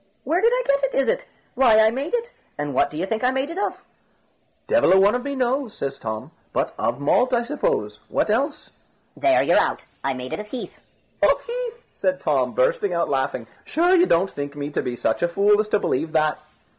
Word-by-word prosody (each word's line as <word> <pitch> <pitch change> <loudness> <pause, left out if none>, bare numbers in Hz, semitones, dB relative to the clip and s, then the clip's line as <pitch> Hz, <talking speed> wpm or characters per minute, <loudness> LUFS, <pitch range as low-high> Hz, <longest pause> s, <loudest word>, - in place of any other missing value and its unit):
"Where 340 +4 +1
did 460 +2 +4
I - - +1
get 280 0 +1
it, 275 - 0
is 275 - +2
it? - - 0 0.3
Why, 245 -4 +5
I 220 0 +5
made 275 - -2
it. 475 +1 -3 0.3
And 145 -1 -3
what - - +2
do 150 - -8
you 175 - -1
think 220 +4 -3
I 250 - +4
made 265 +4 -1
it 355 - -5
of?" 410 - -3 0.8
"Devil 290 -9 +4
a 190 - +6
one 200 +2 +5
of 245 - -1
me 280 0 -3
knows," 255 -2 -1
said 140 0 -3
Tom; 110 -1 -5 0.2
"but - - -1
of 120 +3 -1
malt, 250 - +2
I 240 - +1
suppose, 420 - -2
what - - 0
else?" - - -1 0.4
"There 335 0 +3
you're - - +4
out. - - -1 0.2
I 135 -1 -1
made 125 0 -6
it - - -3
of 210 - -7
heath." 250 +3 -7 0.4
"Of - - +3
heath!" 480 0 -5
said 275 0 -1
Tom, - - 0
bursting - - +1
out - - 0
laughing; - - -1 0.2
"sure 350 +3 +2
you 360 0 +5
don't 185 +4 +2
think 145 0 -6
me 145 0 -5
to - - -1
be 125 - -4
such 115 -2 -1
a 175 - +3
fool 205 +4 +3
as 215 - +1
to 215 - +2
believe 160 -3 -1
that?" 155 -1 +1
250 Hz, 230 wpm, -23 LUFS, -, 0.8 s, a